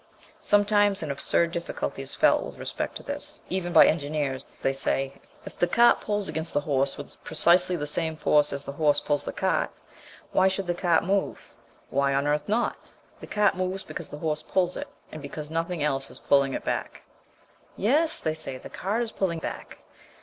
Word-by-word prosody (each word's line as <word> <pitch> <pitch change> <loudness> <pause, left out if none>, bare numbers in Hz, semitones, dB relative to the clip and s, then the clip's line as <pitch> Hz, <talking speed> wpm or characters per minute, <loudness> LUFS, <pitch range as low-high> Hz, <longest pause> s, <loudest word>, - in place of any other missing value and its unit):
Sometimes 205 -2 +3
an 150 - -3
absurd 165 +4 +2
difficulty 170 0 -4
is - - -6
felt - - +4
with - - -9
respect - - -3
to - - -7
this, 290 +1 -6
even 180 -1 -2
by - - +8
engineers. 145 -3 -1 0.2
They 135 - +2
say, 135 0 -1 0.2
"If - - -10
the 175 - +3
cart 235 +7 +5
pulls 205 -1 -2
against 160 +1 -3
the 145 - +3
horse 140 -2 0
with 145 - -11
precisely 175 +3 +4
the 150 -3 -3
same 160 +1 0
force 150 -1 +3
as 140 0 -4
the - - -5
horse 145 0 +2
pulls 145 -1 -1
the - - -3
cart, - - 0 0.6
why 190 - +4
should 190 0 -1
the 175 - 0
cart 170 -1 +2
move?" 195 +2 -2 0.4
Why 140 0 +2
on 140 +1 +1
earth 150 +2 0
not? 230 +3 +1 0.4
The - - -10
cart 210 -1 +2
moves 185 +1 -2
because 155 - -7
the 145 - -7
horse 155 0 -2
pulls 180 -1 0
it, - - -5 0.2
and 155 - -8
because 150 +2 -7
nothing 165 0 -2
else 135 -2 +1
is - - -5
pulling 140 -1 +2
it - - -4
back. - - -3 0.7
"Yes," 295 - +2
they 155 - -1
say, 155 -4 -5
"the - - -11
cart 215 +5 -1
is 225 - -5
pulling 180 -4 -1
back." 160 - -7
160 Hz, 195 wpm, -26 LUFS, 145-190 Hz, 0.7 s, by